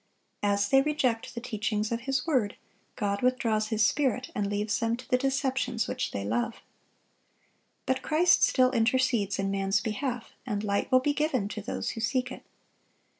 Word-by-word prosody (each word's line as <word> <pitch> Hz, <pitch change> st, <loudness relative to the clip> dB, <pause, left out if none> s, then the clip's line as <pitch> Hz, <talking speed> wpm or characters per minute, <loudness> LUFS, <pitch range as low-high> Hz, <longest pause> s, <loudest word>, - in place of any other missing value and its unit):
(715) 205 Hz, 0 st, +2 dB
As 200 Hz, 0 st, 0 dB
they 270 Hz, -, +6 dB
reject 255 Hz, -6 st, -1 dB
the -, -, -3 dB
teachings 215 Hz, -2 st, -2 dB
of 230 Hz, -, 0 dB
His 270 Hz, 0 st, -1 dB
word, 255 Hz, -11 st, +1 dB, 0.4 s
God 200 Hz, -1 st, -1 dB
withdraws 230 Hz, -4 st, +1 dB
His 215 Hz, -1 st, +2 dB
Spirit, 255 Hz, -1 st, 0 dB
and 205 Hz, -1 st, -1 dB
leaves 210 Hz, +2 st, -1 dB
them 230 Hz, 0 st, 0 dB
to 255 Hz, -, -12 dB
the -, -, +3 dB
deceptions 260 Hz, -3 st, 0 dB
which -, -, -2 dB
they 100 Hz, 0 st, -4 dB
love. 120 Hz, -, -1 dB, 1.3 s
But 260 Hz, 0 st, 0 dB
Christ 330 Hz, +5 st, +3 dB
still 255 Hz, -1 st, +4 dB
intercedes 235 Hz, -4 st, +1 dB
in 195 Hz, 0 st, -1 dB
man's 195 Hz, 0 st, +1 dB
behalf, 235 Hz, +3 st, -4 dB
and 210 Hz, -4 st, -3 dB
light 200 Hz, +4 st, -1 dB
will 255 Hz, 0 st, +6 dB
be 290 Hz, +2 st, +1 dB
given 285 Hz, -8 st, 0 dB
to 215 Hz, -, -5 dB
those 210 Hz, -, -3 dB
who 225 Hz, -, -6 dB
seek 255 Hz, +3 st, 0 dB
it. -, -, -8 dB
235 Hz, 175 wpm, -28 LUFS, 210-260 Hz, 1.3 s, they